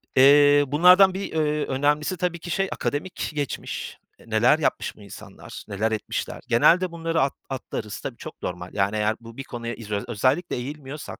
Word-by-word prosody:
Eee, 145 +2 +7
bunlardan 180 +7 +6
bir, 195 +1 -5
ööö, 150 -1 0
önemlisi 150 +6 0
tabii 175 -1 -2
ki 175 - -9
şey, 195 +3 0
akademik 165 +6 -3
geçmiş. 145 -2 -4 0.2
E, - - -18
neler 120 +8 +4
yapmış 150 - -1
bu - - -17
insanlar, 100 - -11
neler 110 +3 -1
etmişler? 110 - -4
Genelde 170 +10 +4
bunları 165 -1 -1
at 135 - +1 0.2
atlarız. 120 -5 -5
Tabii, - - -6
çok - - -10
normal, 90 0 -6
yani, 100 +1 0
eğer 110 +1 +1
bu 115 0 -13
bir 135 - -5
konuya 120 -2 -6
izo 105 -2 -4
özellikle 130 - 0
eğilmiyorsak 140 +3 -7
140 Hz, 170 wpm, -24 LUFS, 115-160 Hz, 0.2 s, Eee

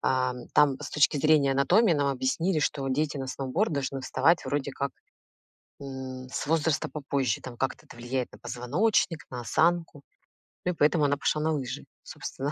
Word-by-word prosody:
Ам, 125 -1 0
там 140 -1 +4
с 145 - -5
точки 150 0 +3
зрения 150 -1 +4
анатомии 140 +10 +4
нам 145 -3 +1
объяснили, 140 +7 0
что 140 -2 -1
дети 145 +2 0
на 135 - -4
сноуборд 135 +10 -1
должны 135 -1 -2
вставать 140 +6 +2
вроде 145 -1 -1
как, 140 0 -3 0.9
м, 130 -1 -7
с - - -3
возраста 155 0 +1
попозже, 140 -6 -1
там 125 -2 -9
как-то 130 +1 -3
это - - -13
влияет 120 +1 -3
на - - -13
позвоночник, 155 - 0
на 125 - -5
осанку, 165 +3 +1 0.6
ну 180 - +1
и - - -14
поэтому 150 0 +3
она 145 0 +2
пошла 150 +1 0
на 160 +1 +1
лыжи, 135 -4 -4 0.2
собственно. 140 +2 -5
140 Hz, 175 wpm, -28 LUFS, 130-155 Hz, 0.9 s, там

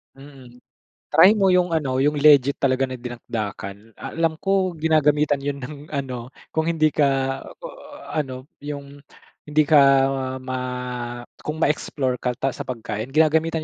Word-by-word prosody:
Mm. 135 -3 -15 0.4
Try 195 - +7
mo 195 - +4
yung 180 -1 +3
ano 135 -4 0
yung 145 0 +1
legit 140 -2 +5
talaga 135 -1 +2
na 130 -2 -4
dinakdakan. 110 -3 -6
Alam 165 -1 -2
ko 190 -3 +1
ginagamitan 150 -2 +2
'yon 140 -1 -4
ng 150 +2 -7
ano, 130 -4 -5 0.2
kung 160 +1 -1
hindi 155 -2 +2
ka, 145 -1 +3 0.4
ah, - - -11
ano 130 -3 -5 0.2
yung 145 -1 -8 0.5
hindi 150 +1 +3
ka 150 +1 +4 0.7
ma 130 0 -4 0.8
kung 155 +2 -3
ma-explore 135 -4 -1
ka 125 -1 -2
pa 135 +1 -1
sa - - -8
pagkain 110 -2 -4
ginagamitan 160 +1 +2
140 Hz, 140 wpm, -22 LUFS, 130-155 Hz, 0.8 s, Try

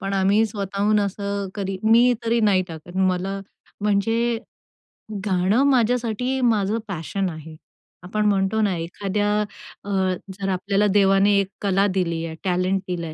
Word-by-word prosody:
पण 195 0 -3
आम्ही 195 +3 +3
स्वतःहून 205 +1 0
असं 200 0 -3
कधी, 195 -2 -3
मी 235 +3 +5
तरी 230 +1 +2
नाही 190 -2 +3
टाकत. 165 +3 -10
मला 190 +1 0 0.4
म्हणजे 225 +3 +1 0.9
गाणं 195 +5 +2
माझ्यासाठी 250 0 +1
माझं 205 +1 0
पॅशन 190 +1 -3
आहे. 160 -1 -9 0.5
आपण 210 +4 -1
म्हणतो 205 +1 +2
ना, 200 -3 +1
एखाद्या 200 +5 -2 0.5
अ, 200 - -8 0.4
जर 195 0 -4
आपल्याला 200 +2 +1
देवाने 200 0 +4
एक 195 - 0
कला 195 0 +2
दिली 165 -2 -1
आहे, 160 -1 -6
टॅलेंट 185 +1 +1
दिलंय, 170 -3 -4
195 Hz, 135 wpm, -23 LUFS, 185-210 Hz, 0.9 s, मी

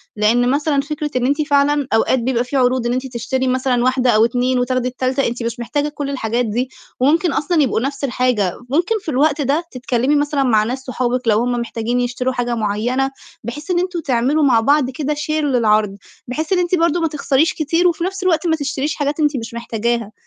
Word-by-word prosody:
لإن 230 +4 +2
مثلًا 285 +1 +1
فكرة 300 +1 -4
إن 250 - +1
أنتِ 285 +4 +1
فعلًا 285 -1 +2
أوقات 225 +3 +3
بيبقى 240 0 0
فيه 255 +3 -3
عروض 255 -1 +2
إن 240 - 0
أنتِ 255 +1 -2
تشتري 260 +2 -1
مثلًا 255 -1 +1
واحدة 255 0 +2
أو 220 0 +5
2 250 +2 0
وتاخدي 250 0 0
التالتة، 255 +2 -1
أنتِ 240 0 -4
مش 235 +1 -3
محتاجة 290 +5 -1
كل 290 -1 -5
الحاجات 240 -2 -1
دي 245 +4 -2 0.3
وممكن 320 +7 +2
أصلًا 315 +1 +1
يبقوا 255 - 0
نَفْس 275 +3 -4
الحاجة. 245 -7 +1 0.2
ممكن 340 - +1
في 325 - -6
الوقت 290 +2 +2
ده 285 +5 +1
تتكلّمي 255 +2 0
مثلًا 290 -1 +1
مع 220 -5 +3
ناس 250 +5 -3
صحابِك 250 -1 -2
لو 215 -1 +4
هم 245 +1 0
محتاجين 235 0 -2
يشتروا 245 +1 -1
حاجة 245 -1 -1
معيّنة، 235 +5 -1 0.3
بحيث 285 +9 -6
إن 350 - +2
أنتم 360 -1 -2
تعملوا 275 +1 +1
مع 250 -5 +4
بعض 280 +2 +2
كده 290 +3 -2
share 295 +1 -5
للعَرْض، 215 -7 +2 0.3
بحيث 310 +8 -2
إن 365 - +2
أنتِ 355 +1 +1
برضه 335 0 +2
ما 325 - +2
تخسريش 300 +1 +1
كتير 330 +3 +1
وفي 340 -1 0
نَفْس 385 +1 -3
الوقت 340 -2 +1
ما 320 - +3
تشتريش 285 -1 -2
حاجات 290 +1 -2
أنتِ 295 -3 +2
مش 230 0 -6
محتاجاها. 235 -1 -2
260 Hz, 205 wpm, -18 LUFS, 240-295 Hz, 0.3 s, أو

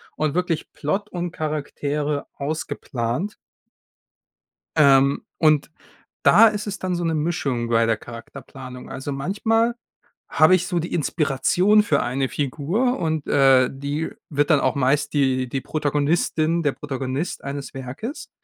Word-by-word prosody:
und 155 -1 -1
wirklich 175 -3 -1
Plot 195 +8 -2
und 175 -1 -4
Charaktere 150 -1 -2
ausgeplant. 140 - -3 1.4
Ähm, 140 +2 +5 0.2
und 155 -1 +3 0.5
da 230 - +7
ist 210 +1 -4
es 205 - -4
dann 185 -1 -2
so 175 - -2
'ne 165 -1 0
Mischung 145 -7 -1
bei 115 -1 +3
der 115 -1 +2
Charakterplanung. 125 +2 -10
Also, 135 +2 -5
manchmal 225 +10 +1 0.6
habe 155 +4 +5
ich 180 0 +1
so 175 -2 -1
die 170 - -4
Inspiration 175 +7 +2
für 145 -8 +1
eine 130 +2 -1
Figur 170 - -1
und, 160 -3 -1
äh, 135 -2 +5
die 145 +4 -3 0.2
wird 145 +1 +1
dann 145 -3 +5
auch 130 - +1
meist 140 +2 +1
die 130 -3 +1
die 135 +2 -2
Protagonistin, 155 +3 0
der 145 -3 +1
Protagonist 135 +3 -4
eines 140 0 -6
Werkes. 135 - -7
150 Hz, 135 wpm, -23 LUFS, 135-170 Hz, 1.4 s, da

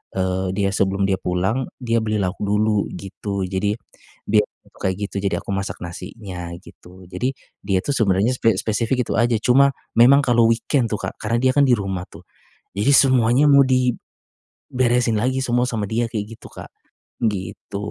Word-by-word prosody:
eee, 95 0 -1
dia 100 -1 +1
sebelum 100 0 0
dia 95 -1 +1
pulang, 95 +9 -1 0.2
dia 115 -1 +1
beli 110 -1 -1
lauk 90 0 -2
dulu, 105 0 +1
gitu. 100 0 -5
Jadi, 100 +2 -1 0.5
biasanya 105 0 +2 0.2
itu - - -24
kayak 95 -1 -1
gitu, - - -17
jadi 100 - 0
aku - - -13
masak 95 0 -4
nasinya, 90 0 -7
gitu. 90 0 -15
Jadi, 125 +9 -2 0.3
dia 95 -1 +1
tuh - - -2
sebenarnya 100 +1 +2
spe 115 -4 +2
spesifik 115 +4 0
itu - - -2
aja, 120 0 +2
cuma 135 +4 +4 0.3
memang 135 +4 +7
kalau 120 -3 +4
weekend 115 +2 +1
tuh - - +1
Kak, - - -5
karena 115 +2 0
dia 130 - +4
kan 145 -1 +5
di 125 - +5
rumah 95 -3 -4
tuh, 80 - -14 0.5
jadi 105 +8 +2
semuanya 130 0 +4
mau 140 -1 +7 0.9
diberesin 125 -2 0
lagi 130 +4 0
semua 120 0 +1
sama 110 -4 -2
dia 115 +1 0
kayak 105 -3 -3
gitu - - -13
Kak. - - -11 0.5
Gitu. 100 -2 -3
110 Hz, 175 wpm, -21 LUFS, 95-120 Hz, 0.9 s, memang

